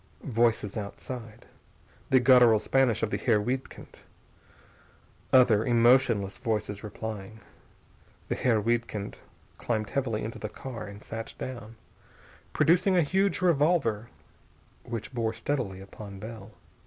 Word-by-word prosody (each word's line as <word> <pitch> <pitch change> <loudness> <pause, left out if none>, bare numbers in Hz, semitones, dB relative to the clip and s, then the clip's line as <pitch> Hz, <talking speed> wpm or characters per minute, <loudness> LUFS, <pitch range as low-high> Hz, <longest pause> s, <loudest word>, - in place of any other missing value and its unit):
Voices 115 -5 +1
outside. 110 +2 -7 0.6
The 130 - +5
guttural 125 -3 +6
Spanish 125 -2 +1
of 110 - 0
the - - 0
Herr 115 -4 +2
Wiedkind. 125 +5 -5 1.3
Other, 120 -5 +5
emotionless 120 -4 +3
voices 105 -2 -2
replying. 110 0 -7 0.9
The - - -1
Herr 115 -4 +2
Wiedkind 115 -2 -2 0.4
climbed 110 -4 -2
heavily 130 -6 -1
into 110 +2 -6
the 110 - -5
car 120 -1 -7
and 100 +1 -11
sat 115 0 -7
down, 120 -3 -7 0.8
producing 180 +3 +3
a 175 - +5
huge 190 +6 +1
revolver 145 - +2 0.7
which 115 +1 -6
bore 115 -2 -1
steadily 110 -8 -3
upon 100 0 -10
Bell. 110 0 -9
115 Hz, 115 wpm, -28 LUFS, 105-130 Hz, 1.3 s, guttural